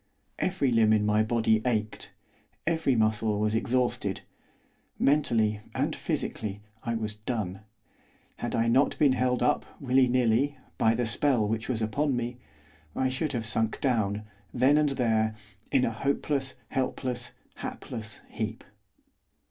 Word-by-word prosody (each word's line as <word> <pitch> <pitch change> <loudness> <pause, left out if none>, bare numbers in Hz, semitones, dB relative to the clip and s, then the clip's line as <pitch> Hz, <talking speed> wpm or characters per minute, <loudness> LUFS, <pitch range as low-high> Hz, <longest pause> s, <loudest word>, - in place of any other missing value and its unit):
Every 175 -8 +1
limb 110 -2 +5
in 105 -1 +3
my 105 +1 +3
body 110 -1 +2
ached; 110 -4 -2 0.5
every 160 -5 +2
muscle 110 -1 +1
was 105 0 +1
exhausted; 120 -4 0 0.8
mentally 115 -7 +2
and - - 0
physically 105 -1 -3 0.2
I 115 0 -2
was 110 -1 -2
done; 105 -3 -3 0.8
had - - -3
I 115 0 +2
not 130 +5 +3
been 145 -3 +5
held 125 -1 +1
up, 150 - +2 0.2
willy 130 -1 +3
nilly, 125 +3 +2 0.2
by 110 +1 +4
the 120 +1 0
spell 120 -2 +2
which 110 +3 -2
was 115 -3 0
upon 140 +6 0
me, 120 0 -3 0.6
I 130 - +1
should 140 +3 -2
have 115 -2 -2
sunk 110 0 0
down, 105 -6 0 0.3
then 135 +4 +4
and 150 -1 +3
there, 110 -5 +1 0.4
in 130 - +4
a - - 0
hopeless, 135 +3 -1
helpless, 125 -2 -2 0.2
hapless 110 -3 -5
heap. - - -4
120 Hz, 140 wpm, -28 LUFS, 110-130 Hz, 0.8 s, limb